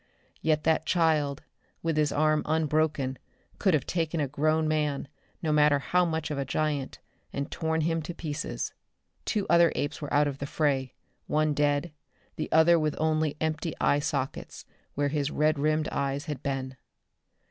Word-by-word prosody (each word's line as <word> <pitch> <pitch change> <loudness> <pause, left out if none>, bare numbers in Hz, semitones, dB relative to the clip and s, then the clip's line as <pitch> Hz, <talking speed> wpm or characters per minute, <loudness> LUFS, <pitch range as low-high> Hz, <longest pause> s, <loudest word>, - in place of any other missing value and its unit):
Yet 155 -1 +1
that 160 0 +2
"child," 155 -5 +2 0.4
with 165 -1 0
his 150 -1 +2
arm 155 +1 +2
unbroken, 155 -4 0 0.4
could 190 -5 +3
have 140 - -1
taken 165 -1 -1
a 145 - +1
grown 155 +3 +1
man, 150 -2 0 0.4
no 155 - +1
matter 150 -1 +5
how 180 +6 +2
much 160 -2 -2
of 145 - -2
a - - 0
giant, 145 0 -2 0.3
and 140 0 -4
torn 160 0 -1
him 165 +1 0
to 170 +2 -6
pieces. 150 -4 -4 0.5
Two 210 -3 0
other 170 0 +5
apes 145 - -2
were 145 - -5
out 145 +1 +4
of 140 -1 -4
the 140 - -4
fray, 135 -4 0 0.3
one 155 0 +2
dead, 145 +2 +1 0.4
the 155 - -4
other 165 +2 +6
with 155 -1 0
only 155 -1 +1
empty 160 +1 -2
eye 145 - +3
sockets 140 -2 -3 0.3
where 145 0 +1
his 145 -1 -1
red 155 0 +1
rimmed 155 +1 +1
eyes 140 0 -2
had 150 -5 -5
been. 135 -2 -3
150 Hz, 170 wpm, -28 LUFS, 145-160 Hz, 0.5 s, other